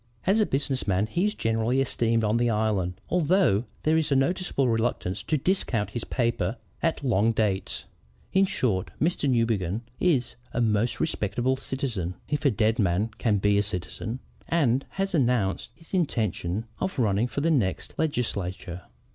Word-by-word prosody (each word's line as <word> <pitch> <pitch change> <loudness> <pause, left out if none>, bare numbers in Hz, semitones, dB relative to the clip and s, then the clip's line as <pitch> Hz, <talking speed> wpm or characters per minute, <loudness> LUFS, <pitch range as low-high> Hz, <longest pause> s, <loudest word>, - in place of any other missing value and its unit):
"As 195 +4 +4
a 215 - +3
business 135 -2 -1
man, 95 +1 +2
he 175 - 0
is 210 - -2
generally 115 +3 +1
esteemed 115 -3 +1
on 105 +2 +2
the 120 0 +2
Island, 105 -5 0 0.2
although 170 - +3 0.2
there 155 +1 +3
is 155 -2 0
a - - +4
noticeable 140 -1 +1
reluctance 115 -5 0
to 155 - 0
discount 130 - 0
his 120 - -4
paper 120 0 0 0.2
at 165 -3 0
long 115 -3 +3
dates. 105 -4 -1 0.5
In 195 0 +4
short, 110 - 0
Mr. 170 +4 +1
John 135 - +3
Newbegin 110 -4 +1 0.2
is 150 -9 +2 0.2
a - - -1
most 115 0 +1
respectable 125 -2 0
citizen 120 -10 -3
(if 150 0 -2
a - - +7
dead 110 +1 +1
man 100 +2 +2
can 110 -4 +2
be 100 +1 +3
a - - +4
citizen) 105 +4 -4 0.3
and 135 -6 +2
has 195 0 0
announced 120 - +1
his 165 +2 -19
intention 110 - 0
of 190 -3 -2
running 110 -1 +2
for 140 - -3
the 165 +2 +2
next 110 -11 0
Legislature!" 100 - -2
120 Hz, 165 wpm, -26 LUFS, 105-145 Hz, 0.5 s, a